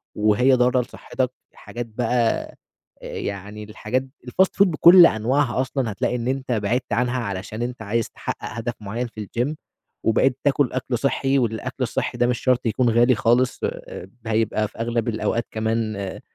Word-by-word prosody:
وهي 110 +5 +3
ضارة 125 0 +3
لصحتك، 125 +1 -3 0.2
حاجات 120 0 -7
بقى 120 +1 0 0.6
آآ - - -7
يعني 100 +2 -5
الحاجات 110 +4 -2 0.2
الFast 185 +10 +4 0.2
food 200 - +3
بكُلّ 170 +2 +8
أنواعها 130 +2 +1
أصلًا 130 -2 -2
هتلاقي 105 +4 -1
إن 120 -1 -3
أنت 130 0 -2
بعِدت 120 +2 -1
عنها، 125 +2 +1
علشان 105 +1 -5
أنت 125 +1 -4
عايز 115 +2 -1
تحقق - - -5
هدف 115 +1 -4
مُعيّن 115 +5 -3
في 110 -3 -8
الGym 125 +9 -2 0.5
وبقيت 125 +3 +2
تاكُل 145 -2 +2
أكل 130 -1 -1
صحّي، 135 +2 +1
والأكل 110 -3 -2
الصحي - - -2
ده 120 - +3
مش 125 -1 0
شرط 130 -1 +1
يكون 120 +2 +2
غالي 120 +2 +4
خالص، 120 +3 +2
آآ 95 - -5 0.2
هيبقى 110 -1 +1
في - - -19
أغلب 115 0 -1
الأوقات 115 +1 -1
كمان 110 0 -1
آآ 100 -1 -5
120 Hz, 165 wpm, -23 LUFS, 110-130 Hz, 0.6 s, بكُلّ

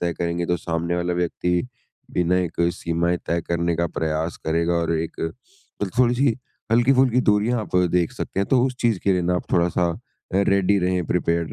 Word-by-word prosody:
तय 85 -1 0
करेंगे, 85 0 -2
तो 90 - +1
सामने 85 +1 -2
वाला 90 0 -1
व्यक्ति 90 +4 -1 0.4
बिना 90 +1 +1
एक 90 -2 -2
सीमाएँ 85 +1 -1
तय 85 0 0
करने 85 -1 0
का 85 0 +1
प्रयास 80 +1 -2
करेगा 85 +2 +1
और 85 -1 0
एक 80 +1 -5
मतलब 105 - -7
थोड़ी-सी 125 0 +3 0.4
हल्की-फुल्की 125 +1 +4
दूरियाँ 110 +2 +2
आप 100 - -3 0.2
देख 90 -2 +1
सकते 95 - -3
हैं 100 - 0
तो 125 -2 +4
उस 130 -1 -4
चीज़ 115 -5 +2
के 100 - +4
लिए 90 -1 +1
ना 90 +1 +1
आप - - -6
थोड़ा-सा 85 0 +2 0.5
रेडी 100 0 +3
रहें, 90 -1 0
प्रिपेयर्ड 85 -1 0
90 Hz, 180 wpm, -23 LUFS, 85-105 Hz, 0.5 s, हल्की-फुल्की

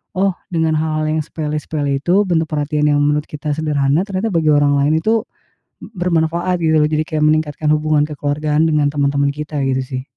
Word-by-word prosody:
oh, 195 +1 +1 0.2
dengan 160 -1 +1
hal-hal 155 0 -1
yang - - 0
sepele-sepele 150 -2 -3
itu, 190 +4 +3
bentuk 165 -2 +1
perhatian 150 0 0
yang 145 - +2
menurut 150 +1 +1
kita 150 0 -5
sederhana 150 0 +1
ternyata 195 +2 -2
bagi 160 -2 +2
orang 145 -1 +3
lain 145 +3 +2
itu 220 +3 +1 0.6
bermanfaat, 175 -2 -1
gitu, 160 -1 +3
loh, 150 - +2
jadi 155 0 0
kayak 155 -2 -1
meningkatkan 155 0 0
hubungan 155 -1 +1
kekeluargaan 150 +1 0
dengan 150 -2 +2
teman-teman 140 -1 +1
kita, 150 +1 -6
gitu, 130 -1 0
sih. 130 -1 -5
155 Hz, 175 wpm, -18 LUFS, 145-160 Hz, 0.6 s, itu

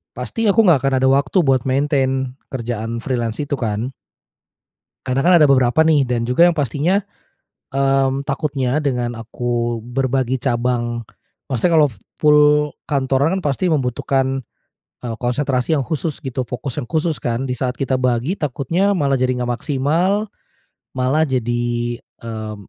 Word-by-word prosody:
pasti 225 -1 -2
aku 220 +3 +5
nggak 170 -7 +5
akan 135 -1 +1
ada - - +5
waktu 140 +6 +2
buat 135 -2 +2
maintain 135 -1 0
kerjaan 115 -2 -4
freelance 120 0 -2
itu 145 -1 -3
kan. 115 +2 -2 1.1
Karena 130 +1 0
kan 180 - +6
ada - - +7
beberapa 130 +2 +4
nih 150 -4 +3
dan 120 -1 -1
juga 125 +9 +4
yang 175 - +3
pastinya. 150 - +1 0.7
Mmm, 135 0 +2
takutnya 140 -2 -1
dengan 125 -5 -2
aku 120 0 -2
berbagi 130 +1 -1
cabang, 120 -2 -1 0.5
maksudnya 140 +7 +1
kalau 150 -2 +5 0.3
full 150 0 +5 0.2
kantoran 140 +3 +1
kan 185 - -6
pasti 145 +5 0
membutuhkan, 135 -3 0 0.6
eee, 115 - -3
konsentrasi 130 +3 0
yang 135 - -2
khusus 155 -1 -3
gitu, 130 -1 -3
fokus 125 +1 -5
yang 120 - -10
khusus 160 0 -1
kan, 120 +2 -1
di 125 - -2
saat 125 0 -3
kita 135 -1 0
bagi 130 +5 0
takutnya 160 +5 0
malah 140 -1 +2
jadi 130 -1 0
nggak 125 - -2
maksimal, 155 - 0 0.7
malah 135 +5 +1
jadi, 120 -2 -1
eee, 110 -3 -8
130 Hz, 145 wpm, -19 LUFS, 120-150 Hz, 1.1 s, ada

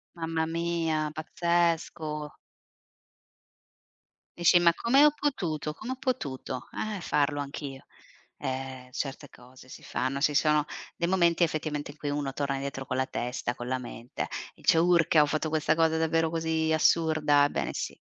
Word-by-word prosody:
Mamma 165 -1 -1
mia, 165 -2 -1
pazzesco. 160 -2 -1 2.0
Dici: 175 +1 +6
"Ma 170 -1 +5
come 270 - +4
ho 300 - +6
potuto 165 - -2
come 230 +10 -7
ho - - -2
potuto, 130 - -3 0.3
eh, - - -5
farlo 145 -2 +1
anch'io?" 140 -1 -6 0.5
Ehm, 130 -1 -5
certe 140 +2 -5
cose 125 +1 -16
si - - -11
fanno, 135 +2 -2
ci 150 0 +3
sono 150 0 +3 0.3
dei 170 - -1
momenti 170 -2 +3
effettivamente 150 -2 -2
in 150 - -19
cui 145 - -4
uno 145 -2 -2
torna 140 -1 -1
dietro 135 -1 -5
con 130 - -2
la 130 - +1
testa 120 0 -3
con 120 0 -7
la 130 0 0
mente. 120 -1 -6 0.3
Dice: 165 - +3
"Urca, 170 -2 +4
ho 150 - +3
fatto 155 +1 -1
questa 155 0 +1
cosa 160 -1 +3
davvero 160 0 +1
così 160 -1 0
assurda?" 155 -2 +4
Ebbene - - -2
sì. - - -4
155 Hz, 155 wpm, -28 LUFS, 140-165 Hz, 2.0 s, Dici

